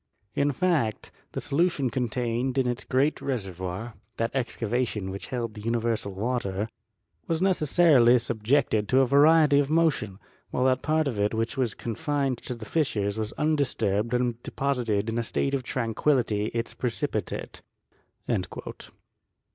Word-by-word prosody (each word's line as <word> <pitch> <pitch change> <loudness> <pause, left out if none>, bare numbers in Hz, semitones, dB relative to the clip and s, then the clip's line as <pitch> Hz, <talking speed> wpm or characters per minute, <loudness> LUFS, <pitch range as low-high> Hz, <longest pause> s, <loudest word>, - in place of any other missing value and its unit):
In 145 +1 +2
fact, 145 -8 0 0.2
the - - -2
solution 145 -3 +1
contained 125 +1 -1
in 135 - +3
its 120 +1 -2
great 140 +4 +1
reservoir 95 -2 -4 0.2
(that 115 0 0
excavation 120 -5 -1
which 100 - -7
held 120 -3 -3
the 105 - -9
universal 115 -2 -1
water) 105 -1 -2 0.6
was 165 -1 0
necessarily 155 -8 +5
subjected 115 -1 +1
to 130 +1 +5
a - - +4
variety 145 +2 +5
of 145 -1 +1
motion, 155 - +1 0.3
while 125 - 0
that 130 0 +3
part 155 0 +1
of 115 -6 -2
it 105 +2 +1
which 115 +1 -1
was 125 -5 0
confined 135 +2 -2
to 125 - -5
the 115 -2 -9
fissures 105 -7 0
was 110 0 -2
undisturbed 120 -7 0
and 120 -1 0
deposited 120 -8 -1
in 115 +1 -1
a - - 0
state 135 +4 -1
of 135 - +1
tranquillity 115 -3 0
its 115 +1 -3
precipitate." 120 - -3
120 Hz, 140 wpm, -27 LUFS, 110-140 Hz, 0.6 s, necessarily